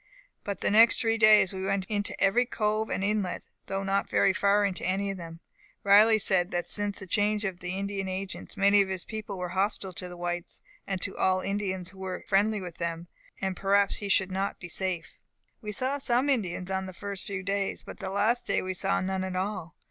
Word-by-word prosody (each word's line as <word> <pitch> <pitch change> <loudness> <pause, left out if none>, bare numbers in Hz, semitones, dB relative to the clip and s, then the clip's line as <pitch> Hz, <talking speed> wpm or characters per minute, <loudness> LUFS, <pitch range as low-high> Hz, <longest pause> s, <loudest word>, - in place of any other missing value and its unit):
But 200 -2 -4
the - - +1
next 225 +2 +6
three 225 -1 +1
days 215 -4 +6
we 190 0 -4
went 195 0 0
into 205 0 -2
every 240 +5 +3
cove 215 -1 0
and 195 - -2
inlet, 205 -2 -1 0.2
though 195 0 -2
not 195 0 0
very 195 - +3
far 205 +1 +3
into 190 -3 -3
any 195 +3 0
of 195 - -6
them. 165 -1 -9 0.4
Riley 210 +2 +7
said 190 -4 +2
that 175 -3 -2
since 205 -1 -2
the 190 - -7
change 210 +2 +1
of 185 -2 -4
Indian 195 +2 -3
Agents, 190 +3 -5
many 200 +1 +5
of 195 - -1
his 185 -2 -1
people 215 -3 -6
were 180 -1 -3
hostile 190 +1 -1
to 180 +1 -6
the 175 - -9
whites, 175 0 -4 0.3
and 195 -1 -2
to - - 0
all 185 0 +2
Indians 190 -2 -2
who 190 - -15
were 190 -1 -5
friendly 210 +2 +2
with 180 -3 -8
them, 170 0 -3 0.3
and 190 -1 -1
that - - -13
perhaps 200 0 +3
he 205 - -5
should 190 -1 +2
not 195 +1 -2
be 175 - -8
safe. 185 -1 -2 0.4
"We 210 -2 -5
saw 260 +6 -1
some 260 +2 +2
Indians 185 -6 -1
on 190 0 -1
the 185 - -9
first 200 -1 -5
few 195 -2 -4
days, 195 0 -2
but - - -10
the 190 - -4
last 210 +5 +1
day - - +1
we 185 0 -3
saw 195 +2 0
none 190 0 -1
at 185 -1 -4
all. 185 -3 -3
195 Hz, 220 wpm, -28 LUFS, 185-205 Hz, 0.4 s, Riley